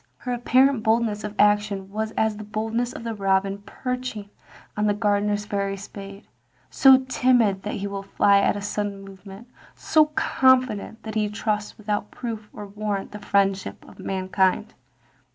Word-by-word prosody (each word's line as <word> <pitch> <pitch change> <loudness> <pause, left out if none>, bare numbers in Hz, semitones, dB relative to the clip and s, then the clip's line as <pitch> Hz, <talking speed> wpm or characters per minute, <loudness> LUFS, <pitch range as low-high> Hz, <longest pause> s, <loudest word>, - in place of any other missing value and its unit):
Her 250 - -4
apparent 255 +1 +3
boldness 220 -1 +1
of 210 0 -5
action 205 -2 +2
was 220 +1 -2
as 220 -1 +1
the 215 - -7
boldness 225 +3 -2
of - - -8
the 230 -1 -3
robin 195 -1 0
perching 250 -5 -5 0.4
on 210 0 +1
the 205 - +2
gardener's 205 0 0
very 200 -1 -2
spade 200 0 -10 0.3
— - - -40 0.2
so 265 -1 +6
timid 245 -7 +2
that 210 - -4
he 200 - -4
will 200 0 -4
fly 200 0 +3
at 200 - +2
a - - -5
sudden 205 -1 -3
movement, 195 +3 -12 0.3
so 310 -1 +3
confident 255 -7 +1
that 220 - -6
he 210 -1 0
trusts 210 0 -3
without 210 -1 -3
proof 220 -3 -6
or 210 - -8
warrant 205 -1 -4
the 210 - -8
friendship 195 -1 0
of - - -16
mankind. 190 +2 0
210 Hz, 165 wpm, -24 LUFS, 200-225 Hz, 0.4 s, so